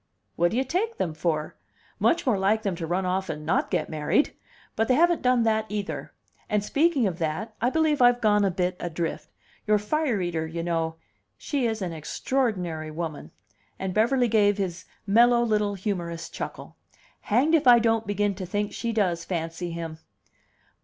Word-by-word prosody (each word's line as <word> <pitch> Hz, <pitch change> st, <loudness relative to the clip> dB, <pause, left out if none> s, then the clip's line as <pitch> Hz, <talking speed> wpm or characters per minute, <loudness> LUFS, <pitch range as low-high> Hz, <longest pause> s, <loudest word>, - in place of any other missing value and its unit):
"What 175 Hz, +1 st, +3 dB
do 225 Hz, -, -2 dB
you 260 Hz, -, +2 dB
take 390 Hz, -, -2 dB
them 165 Hz, -, -1 dB
for? 155 Hz, -1 st, -2 dB, 0.4 s
Much 340 Hz, -1 st, +2 dB
more 230 Hz, -7 st, +2 dB
like 215 Hz, +3 st, +2 dB
them 195 Hz, -4 st, -1 dB
to 165 Hz, -, -4 dB
run 180 Hz, +3 st, 0 dB
off 190 Hz, +1 st, -1 dB
and 150 Hz, 0 st, -5 dB
not 160 Hz, -, +1 dB
get -, -, 0 dB
married. 155 Hz, -, +1 dB, 0.4 s
But 225 Hz, +1 st, +1 dB
they 255 Hz, -, +4 dB
haven't 345 Hz, +2 st, +3 dB
done 250 Hz, -2 st, +3 dB
that 220 Hz, -1 st, +1 dB
either. 155 Hz, -9 st, -4 dB, 0.4 s
And, 210 Hz, -1 st, +1 dB
speaking 285 Hz, +2 st, +2 dB
of 180 Hz, -3 st, -2 dB
that, 170 Hz, +8 st, -2 dB
I 240 Hz, -, +3 dB
believe 310 Hz, -1 st, +1 dB
I've 245 Hz, 0 st, +5 dB
gone 210 Hz, -2 st, +3 dB
a 195 Hz, -, +3 dB
bit 180 Hz, 0 st, -1 dB
adrift. 170 Hz, -1 st, -3 dB, 0.4 s
Your 210 Hz, 0 st, +4 dB
fire 250 Hz, +2 st, 0 dB
eater, 170 Hz, -3 st, -2 dB
you 165 Hz, +1 st, -4 dB
know 165 Hz, -1 st, -1 dB, 0.4 s
she 275 Hz, -6 st, -1 dB
is 220 Hz, -3 st, -2 dB
an 175 Hz, -2 st, -3 dB
extraordinary 175 Hz, -, -2 dB
woman!" 155 Hz, -1 st, -5 dB, 0.5 s
And 190 Hz, -1 st, -3 dB
Beverly 240 Hz, +4 st, +3 dB
gave 205 Hz, -2 st, +3 dB
his 185 Hz, -3 st, -3 dB, 0.2 s
mellow, 235 Hz, +4 st, +5 dB
little 210 Hz, -3 st, +1 dB
humorous 175 Hz, -4 st, -4 dB
chuckle. -, -, -7 dB, 0.4 s
"Hanged 260 Hz, +9 st, +2 dB
if 315 Hz, -4 st, +3 dB
I 240 Hz, -1 st, +9 dB
don't 225 Hz, -1 st, +1 dB
begin 205 Hz, 0 st, 0 dB
to 190 Hz, -1 st, -6 dB
think 205 Hz, +3 st, -2 dB
she 235 Hz, -, -2 dB
does 180 Hz, -7 st, 0 dB
fancy 165 Hz, 0 st, -4 dB
him." 165 Hz, -1 st, -6 dB
205 Hz, 180 wpm, -26 LUFS, 170-235 Hz, 0.5 s, I